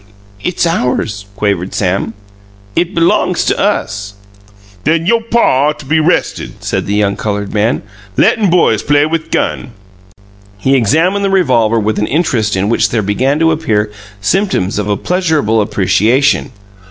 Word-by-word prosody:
"It's 180 -1 0
ours," 125 - -1
quavered 100 -3 -1
Sam. 100 +3 -1 0.6
"It 175 +2 0
belongs 170 0 +2
to - - 0
us." 100 +1 -1 0.7
"Then 165 +1 +1
you' 230 +4 +2
pa 145 - +3
ought 150 - -1
to 150 - -11
be 155 +4 +2
'rested," 160 +3 -1
said - - -2
the 100 - -1
young 100 -1 +1
coloured 105 -1 -3
man. 110 +3 0 0.3
"Lettin' 210 -4 +3
boys 165 - +3
play 145 0 +2
with 160 0 -3
gun!" 120 - -2 0.8
He 130 +7 +1
examined 165 - +2
the 195 - +1
revolver 120 - +2
with 110 0 -1
an 105 - 0
interest 125 - 0
in 95 +1 0
which 115 - +2
there 115 -2 -1
began 130 +8 0
to 165 0 +4
appear 110 -10 0 0.3
symptoms 105 - 0
of 105 0 -2
a 100 - +1
pleasurable 160 - +1
appreciation. 110 +6 +1
125 Hz, 155 wpm, -13 LUFS, 105-165 Hz, 0.8 s, to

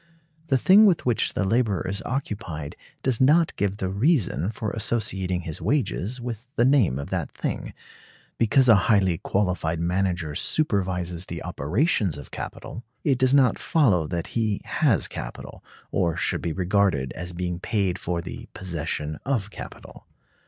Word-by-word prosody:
The 135 -4 +3
thing 200 - +7
with 180 -5 +2
which 120 -3 +1
the - - +1
laborer 110 -2 +1
is 100 +3 -2
occupied 100 - -4 0.3
does 130 -3 +1
not 155 +5 +4
give 100 -1 -1
the 95 -3 -2
reason 100 - +1
for 110 -1 -4
associating 100 -5 -1
his 80 -3 -5
wages 125 -4 0
with 120 -1 -6
the 120 - +3
name 125 - +3
of 70 - -6
that - - -2
thing; - - -4 0.7
because 125 +3 +4
a 115 - +9 0.2
highly 95 -6 +3
qualified 90 -5 -1
manager 90 -2 -1
supervises 90 - 0
the - - -6
operations 95 - 0
of 70 - -10
capital, 120 - -7 0.2
it 135 -4 +2
does 130 +1 +4
not 135 -3 +4
follow 100 - +2
that 85 -1 -3
he 110 -3 0
has - - +2
capital, - - -8 0.3
or 85 -4 0
should - - 0
be 85 - -2
regarded 90 -6 +1
as 90 +1 -6
being 90 0 -3
paid 95 -2 -1
for 85 -1 -2
the - - -8
possession 80 -4 -4
of 115 -7 -1
capital. - - -11
100 Hz, 155 wpm, -25 LUFS, 85-120 Hz, 0.7 s, a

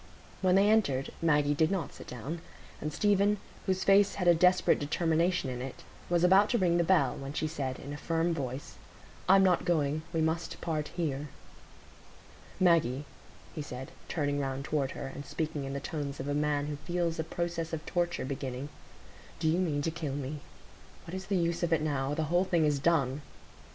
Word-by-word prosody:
When 185 -1 +4
they 195 +1 +5
entered, 165 -12 +2
Maggie 150 -3 +3
did 155 +2 +2
not 185 -7 -2
sit - - -11
down, 140 +8 -6 0.4
and 150 - -2
Stephen, 205 +3 +3 0.3
whose 190 0 +1
face 200 0 +5
had 180 -3 -1
a 175 - +8
desperate 180 +2 +4
determination 165 +2 +1
in 125 -1 -4
it, 130 0 -7 0.3
was 175 0 +2
about 190 +3 +6
to 240 - +2
ring 175 -4 +3
the - - +4
bell, 160 -7 +3
when 135 +1 -6
she 155 - -1
said, 135 -5 -3
in 140 +1 -7
a - - -5
firm 165 +2 0
voice,— 135 -3 -5 0.5
"I'm 195 0 +7
not 185 -2 +3
going; 155 -3 +1
we 165 - -1
must 160 +1 -1
part 155 -3 -2
here." 150 -4 -3 1.3
"Maggie," 155 -7 +3 0.5
he 155 - -4
said, 130 -2 -7 0.2
turning 145 -3 0
round 135 0 -3
toward 145 -4 0
her, - - -4
and 135 +1 -7
speaking 150 -2 -3
in 135 - -4
the 140 - -2
tones 140 -1 -4
of 130 - -4
a 145 - 0
man 145 -1 +1
who 145 -1 -4
feels 170 +1 -2
a - - +1
process 170 0 -3
of 160 -1 -4
torture 175 -4 -1
beginning, 135 0 -4 0.7
"do 160 - -1
you 165 +3 +3
mean 150 -6 0
to 165 - 0
kill 155 -4 -4
me? 145 +1 -4 0.7
What 165 - -9
is 190 0 -5
the 200 - +1
use 170 -1 0
of 170 -1 0
it 160 -2 +3
now? 140 -2 -1
The 160 - 0
whole 175 +1 +5
thing 170 -4 +2
is 145 -2 +2
done." 145 -3 +1
160 Hz, 195 wpm, -30 LUFS, 140-175 Hz, 1.3 s, a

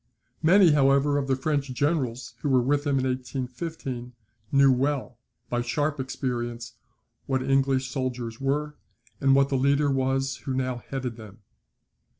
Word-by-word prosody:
Many, 180 +1 +6
however, 140 0 +3
of 135 - -3
the 135 - +2
French 140 0 -1
generals 130 -3 -1
who 145 - -2
were 130 -1 +4
with 145 +3 +1
him 140 -1 +2
in 130 - 0
1815, 130 0 -4 0.4
knew 140 -1 +6
well, 130 -2 -1 0.3
by 120 0 -1
sharp 145 +5 -1
experience, 120 -3 -4 0.5
what 130 -1 0
English 135 -1 +1
soldiers 125 -3 -4
were, 150 +2 -1 0.5
and 135 -1 +4
what 140 0 +4
the 135 - +1
leader 140 +2 +2
was 135 0 0
who 130 - -4
now 130 -1 -1
headed 130 -4 -4
them. 110 -1 -12
135 Hz, 150 wpm, -26 LUFS, 125-140 Hz, 0.5 s, Many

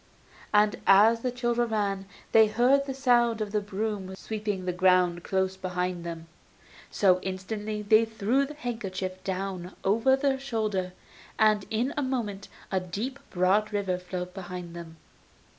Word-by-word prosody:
And 210 0 +4
as 215 +4 +6
the 250 - -1
children 240 -1 0
ran 200 -3 -1 0.3
they 220 -1 +7
heard 255 +6 +3
the 270 - -2
sound 240 -4 +3
of 210 -2 -3
the 210 0 0
broom 200 -1 -4
sweeping 210 -2 -4
the 180 - -1
ground 180 -1 +3
close 190 0 0
behind 180 -1 -3
them, 165 -1 -6 0.6
so 185 -2 +3
instantly 210 +3 -4
they 215 +2 +5
threw 225 +4 +1
the 300 - -9
handkerchief 195 -8 -5
down 190 -1 -4
over 230 +7 +3
their 270 -1 0
shoulder, 215 -8 -2 0.4
and 215 -2 +3
in 235 +5 0
a - - +1
moment 225 -7 -3 0.2
a 190 - +2
deep, 210 +10 -5
broad 190 +4 +2
river 195 -3 -1
flowed 180 0 -6
behind 180 -2 -7
them. 165 -1 -9
205 Hz, 150 wpm, -27 LUFS, 185-225 Hz, 0.6 s, they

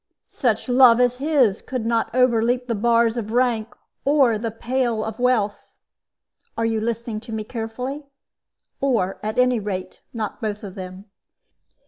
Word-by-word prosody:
"Such 230 -4 0
love 250 -2 +6
as 250 0 +2
his 270 -8 +2
could 255 -4 -4
not 230 0 +1
overleap 245 0 +2
the 240 - -2
bars 230 +1 +2
of 220 -2 -4
rank 235 -2 0 0.3
or 270 -6 +3
the 230 +1 -2
pale 235 0 -1
of 220 +1 -6
wealth 235 -5 0 0.8
are 230 - 0
you 225 -1 0
listening 230 -1 -3
to 230 +1 -11
me 220 -1 -3
carefully? 250 +6 -5 0.7
or, 230 -9 0
at 215 +1 -4
any 250 -1 +3
rate, 185 -3 -5
not 220 -3 -5
both 210 -1 -3
of 195 -3 -7
them. 185 +1 -8
230 Hz, 150 wpm, -22 LUFS, 215-250 Hz, 0.8 s, love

